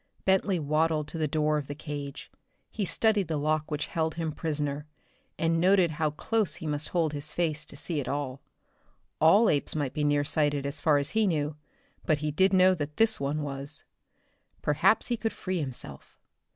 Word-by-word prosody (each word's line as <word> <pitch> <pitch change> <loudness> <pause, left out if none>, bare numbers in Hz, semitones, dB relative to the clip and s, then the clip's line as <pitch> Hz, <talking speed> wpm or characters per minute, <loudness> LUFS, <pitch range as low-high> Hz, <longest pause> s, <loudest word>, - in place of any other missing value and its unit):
Bentley 190 0 +3
waddled 155 0 +1
to 165 - -5
the 155 - +1
door 150 0 +1
of 140 - -7
the 145 - -5
cage. 145 -2 -7 0.4
He 210 - -2
studied 210 -1 +2
the 160 -1 -1
lock 155 +1 0
which 150 -1 -2
held 160 -1 -2
him 165 -2 -2
prisoner, 150 -2 -3 0.5
and 165 0 +1
noted 185 -2 +4
how 155 0 0
close 210 +7 0
he - - -9
must 150 0 -2
hold 165 -4 0
his 145 +1 -3
face 155 -3 -1
to 145 - -8
see 160 +1 -2
at 125 - -7
all. 140 -2 -3 0.8
All 195 +9 +6
apes 145 -3 +1
might 145 -4 -1
be 150 - -1
near 145 0 +2
sighted 145 -1 0
as 140 +2 -3
far 155 -3 +4
as 140 0 -1
he 220 -1 +2
knew; 150 -4 -1 0.5
but 155 -3 +3
he 150 +1 -2
did 190 +6 +3
know 185 0 +6
that 150 -4 -5
this 225 0 +4
one 145 +2 -1
was. 140 +1 -4 0.8
Perhaps 170 +9 +3
he 240 - -1
could 225 0 -2
free 185 -1 -3
himself. 125 - -5
155 Hz, 190 wpm, -28 LUFS, 145-170 Hz, 0.8 s, All